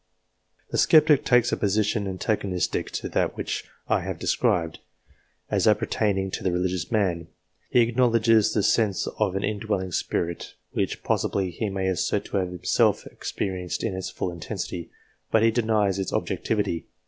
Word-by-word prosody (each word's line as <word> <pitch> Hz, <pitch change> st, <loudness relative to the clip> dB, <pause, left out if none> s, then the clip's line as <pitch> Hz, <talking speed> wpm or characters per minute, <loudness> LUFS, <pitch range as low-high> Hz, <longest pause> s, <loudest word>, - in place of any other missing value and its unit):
The -, -, 0 dB
sceptic 155 Hz, -3 st, +5 dB
takes 120 Hz, -1 st, +3 dB
a -, -, 0 dB
position 105 Hz, +1 st, +1 dB
antagonistic 95 Hz, -2 st, -1 dB
to -, -, -4 dB
that -, -, 0 dB
which -, -, -3 dB, 0.2 s
I -, -, +2 dB
have -, -, -4 dB
described, 80 Hz, -2 st, 0 dB, 0.7 s
as -, -, +2 dB
appertaining 95 Hz, -3 st, +1 dB
to -, -, -4 dB
the 95 Hz, -, +1 dB
religious 90 Hz, 0 st, -1 dB
man. 90 Hz, -7 st, 0 dB, 0.4 s
He 125 Hz, -, +4 dB
acknowledges 115 Hz, -2 st, +3 dB
the 105 Hz, -, +1 dB
sense 105 Hz, -3 st, +2 dB
of 90 Hz, -, +1 dB
an 100 Hz, -, -1 dB
indwelling 100 Hz, -3 st, -2 dB
Spirit, 85 Hz, 0 st, -2 dB, 0.2 s
which -, -, -2 dB
possibly 95 Hz, -2 st, 0 dB
he 105 Hz, +5 st, -3 dB
may 95 Hz, -1 st, -2 dB
assert 95 Hz, -2 st, 0 dB
to -, -, -3 dB
have 95 Hz, -2 st, 0 dB
himself 90 Hz, -1 st, +1 dB
experienced 90 Hz, -2 st, -4 dB
in 105 Hz, -5 st, -1 dB
its 95 Hz, -, -4 dB
full 90 Hz, -, -3 dB
intensity, 85 Hz, 0 st, -5 dB, 0.4 s
but 110 Hz, -, +3 dB
he 115 Hz, -, +5 dB
denies 110 Hz, -4 st, +1 dB
its 95 Hz, -, -2 dB
objectivity. 85 Hz, -, -1 dB
95 Hz, 155 wpm, -25 LUFS, 90-110 Hz, 0.7 s, sceptic